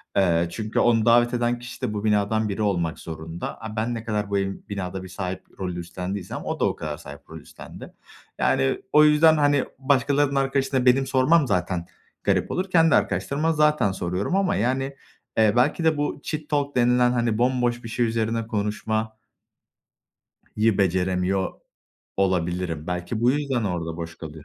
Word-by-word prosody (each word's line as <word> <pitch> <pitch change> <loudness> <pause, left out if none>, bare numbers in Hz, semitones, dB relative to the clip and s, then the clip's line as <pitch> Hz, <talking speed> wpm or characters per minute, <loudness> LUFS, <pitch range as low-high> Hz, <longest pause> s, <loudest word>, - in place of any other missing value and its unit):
Eee, 85 -3 +3
çünkü 110 +3 -2
onu 115 -2 +3
davet 120 +1 +4
eden 120 0 0
kişi 120 0 -10
de, 105 - -2
bu 105 0 -4
binadan 105 +1 +1
biri 100 +2 -3
olmak 85 -6 0
zorunda. 80 +1 -7
A, 110 -1 -7
ben 115 +2 -1
ne 115 - -5
kadar 105 -2 -2
bu 100 - 0
ev 95 0 -1 0.2
binada 95 -2 -4
bir - - -8
sahip 95 0 -5 0.2
rolü 90 -2 -3
üstlendiysem, 90 +2 -5
o - - -3
da - - +2
o - - 0
kadar 75 -1 -5
sahip 70 -2 -12
rol - - -8
üstlendi. - - -12 0.5
Yani, 65 0 +1
o 150 - +7
yüzden 155 +1 +5
hani, 145 -2 +3
başkalarının 140 +1 +2
arkadaşına, 135 -1 +1
benim 135 +2 +4
sormam 135 +3 +3
zaten 90 -2 -1 0.4
garip - - +1
olur. 185 +1 -2
Kendi 165 -3 +4
arkadaşlarıma 155 +4 0
zaten 150 -8 +3
soruyorum 95 - -2
ama 195 0 +1
yani, 135 +3 -1 0.4
eee, 110 -2 +4
belki 125 +7 +2
de 160 -2 +3
bu 145 0 -2
cheat 155 -1 -5
talk 145 -1 -1
denilen, 125 0 +3
hani 120 -3 0
bomboş 125 0 +1
bir 115 - -7
şey 120 +1 0
üzerine 115 0 -1
konuşma 110 +1 -2 1.4
yı 110 -1 +2
beceremiyor 95 0 0 0.6
olabilirim. 90 -4 -1
Belki 90 +5 -3
bu 120 +1 +4
yüzden 135 -4 -1
orada 85 -4 -3
boş 85 0 -7
kalıyor. 80 -2 -9
110 Hz, 170 wpm, -24 LUFS, 95-130 Hz, 1.4 s, o